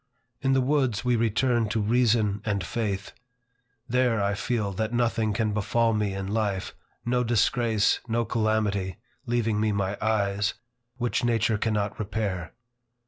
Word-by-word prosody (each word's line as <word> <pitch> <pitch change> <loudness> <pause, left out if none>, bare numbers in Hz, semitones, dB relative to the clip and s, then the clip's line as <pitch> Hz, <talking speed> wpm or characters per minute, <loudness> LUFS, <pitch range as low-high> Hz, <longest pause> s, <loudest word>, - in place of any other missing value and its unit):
In 135 -1 +2
the 135 - +3
woods, 130 -5 +1
we 125 -1 +3
return 115 0 +1
to 110 +1 0
reason 110 -2 +2
and 100 -3 -1
faith. 100 -3 -3 0.8
There 125 -2 +2
I 100 0 +1
feel 105 0 -1
that 110 +3 -2
nothing 115 -2 +1
can 105 0 0
befall 115 +3 +1
me 105 -2 0
in 95 0 -3
life, 100 -2 -1 0.3
no 125 +1 +1
disgrace, 115 -1 +2
no 115 0 0
calamity, 105 -5 0 0.3
(leaving 115 -3 +1
me 110 0 +1
my 100 0 -1
eyes,) 105 -2 +1 0.4
which 120 -1 -1
nature 115 -2 +2
cannot 105 -2 -1
repair. 100 -5 -3
110 Hz, 140 wpm, -26 LUFS, 100-120 Hz, 0.8 s, the